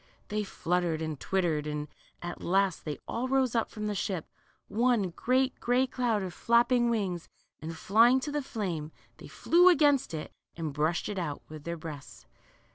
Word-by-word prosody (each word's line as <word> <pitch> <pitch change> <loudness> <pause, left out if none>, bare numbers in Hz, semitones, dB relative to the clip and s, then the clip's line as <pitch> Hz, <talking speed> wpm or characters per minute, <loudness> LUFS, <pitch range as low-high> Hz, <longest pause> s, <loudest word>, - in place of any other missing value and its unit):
They 210 0 -1
fluttered 175 -4 -1
and 155 -3 -4
twittered, 165 -6 0
and 150 0 -3 0.4
at 175 0 -6
last 190 0 +1
they 150 -2 -3
all 245 +3 -2
rose 265 -2 +2
up 230 -2 +1
from 215 -1 -6
the 210 - -1
ship, 190 -4 -2 0.4
one 225 -3 +2
great 255 +8 +1
gray 245 +2 +2
cloud 245 -5 0
of 185 -2 -5
flapping 240 +2 +3
wings, 190 -7 -2 0.3
and 160 +1 -6
flying 230 +8 +5
to 295 - -4
the 295 0 -1
flame, 180 - -4 0.3
they - - -11
flew 355 +2 +5
against 290 - +3
it 155 - -6 0.2
and 160 -3 -3
brushed 155 +4 0
it 205 -2 -3
out 150 -5 -4
with 155 -1 -10
their 170 0 -3
breasts'. 155 -3 -9
195 Hz, 175 wpm, -29 LUFS, 165-245 Hz, 0.4 s, flying